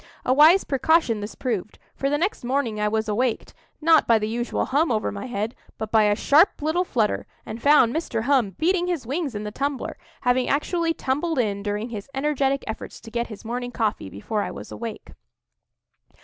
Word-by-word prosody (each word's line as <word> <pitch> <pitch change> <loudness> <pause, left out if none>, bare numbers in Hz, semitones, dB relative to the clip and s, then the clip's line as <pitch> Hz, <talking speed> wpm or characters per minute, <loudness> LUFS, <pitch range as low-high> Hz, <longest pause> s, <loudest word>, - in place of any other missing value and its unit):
A 255 - +3
wise 315 +7 +7
precaution 275 -4 +2
this 205 +1 -6
proved; 215 -6 -3 0.2
for 275 - -1
the 290 - +1
next 360 +1 -1
morning 240 -4 -1
I 210 - +1
was 220 +1 0
awaked, 230 +3 -1 0.3
not 320 0 +4
by 230 - +5
the 215 0 -2
usual 240 +2 -2
hum 290 +2 +1
over 215 -2 0
my 200 +4 -6
head, 220 -1 -3 0.2
but 220 -1 -5
by 220 -1 +5
a 205 0 +3
sharp 295 - +4
little 320 +4 +1
flutter, 230 - -1 0.2
and 220 +2 -7
found 285 -4 +5
Mr. 240 -9 -2
Hum 245 -8 +2
beating 355 +2 +1
his 340 -8 -2
wings 280 0 -3
in 210 - -4
the 210 - -5
tumbler—having 255 -1 -2
actually 330 +3 0
tumbled 295 +4 -1
in 205 -5 0
during 210 +3 -3
his 215 +1 -7
energetic 275 -1 0
efforts 220 - -7
to 225 - -12
get 235 0 -1
his 215 0 -10
morning 245 +2 -3
coffee 220 - -2
before 205 - -3
I - - -3
was - - -9
awake. 230 -2 -7
245 Hz, 190 wpm, -24 LUFS, 220-290 Hz, 0.3 s, wise